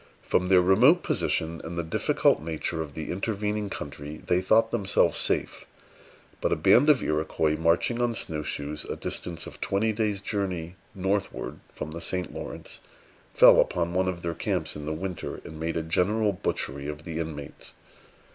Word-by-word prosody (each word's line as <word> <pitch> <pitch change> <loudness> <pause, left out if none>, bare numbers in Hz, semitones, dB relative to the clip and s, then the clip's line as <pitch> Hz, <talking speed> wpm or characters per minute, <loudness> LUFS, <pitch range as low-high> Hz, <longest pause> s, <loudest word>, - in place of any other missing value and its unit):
From 90 - +1
their 90 -1 +5
remote 125 - +5
position, 85 - 0
and 85 +1 -6
the 85 - 0
difficult 80 - +2
nature 80 +1 -2
of 75 -3 -7
the 80 -1 -4
intervening 105 +1 -2
country, 75 -2 -7
they 90 0 +2
thought 110 +4 +3
themselves 100 -5 +2
safe; - - -1 0.7
but - - +1
a - - +4
band 145 +6 +5
of 145 -4 +5
Iroquois, 75 0 0
marching 85 +9 +1
on 120 -1 +1
snow 80 -6 -3
shoes 75 0 -4
a - - -5
distance 85 -1 -5
of - - -10
twenty 110 +3 +1
days' 105 -2 0
journey 90 -5 -3 0.2
northward 95 +1 -2
from 75 - -6
the 85 +1 -6
St. 90 -1 -3
Lawrence, - - -7 0.5
fell - - +8
upon 85 0 +1
one 95 +1 +1
of 90 -2 -3
their 85 0 -1
camps 85 -2 -2
in 75 0 -7
the - - -1
winter, 90 +3 -4
and 80 0 -9
made 80 +1 -2
a 80 - -1
general 105 +6 +1
butchery 70 -6 -3
of 75 0 -6
the 80 -1 -5
inmates. 75 -3 -7
85 Hz, 175 wpm, -27 LUFS, 80-100 Hz, 0.7 s, fell